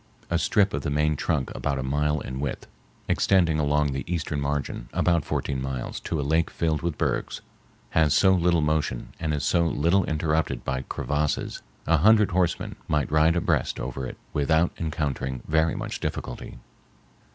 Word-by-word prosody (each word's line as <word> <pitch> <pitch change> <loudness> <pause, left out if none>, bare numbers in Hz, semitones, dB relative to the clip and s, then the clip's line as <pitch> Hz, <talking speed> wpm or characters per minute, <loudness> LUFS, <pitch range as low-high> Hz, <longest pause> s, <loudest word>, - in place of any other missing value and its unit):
A 85 - +2
strip 100 +1 +2
of - - -1
the 80 - -2
main 75 +1 +1
trunk 75 -2 -1
about 70 -2 -2
a 65 - -2
mile 75 +2 0
in 65 +1 -5
width, 70 -2 -3 0.4
extending 85 -5 +3
along 75 -1 +2
the 70 +1 -3
eastern 80 -4 -2
margin 70 -4 -3
about 85 -3 +2
fourteen 65 -2 -2
miles 65 -2 -4
to 80 - -3
a - - 0
lake 80 +3 +2
filled 80 -3 -1
with 85 -3 -2
bergs, - - -1 0.5
has 80 -2 +3
so 95 +5 +5
little 85 -2 +3
motion 75 -5 -1
and 80 -2 -1
is 75 -2 -1
so 85 -1 +2
little 85 +5 +2
interrupted 80 0 -1
by 65 0 -1
crevasses, 75 0 -1 0.2
a 80 +1 +4
hundred 105 +5 +5
horsemen 90 -2 0
might 75 -1 0
ride 80 +2 +4
abreast 85 - 0
over 65 +1 -4
it - - -8 0.2
without 80 +4 +2
encountering 70 -5 -2
very 80 +1 +2
much - - -4
difficulty. - - -5
75 Hz, 170 wpm, -26 LUFS, 70-85 Hz, 0.5 s, so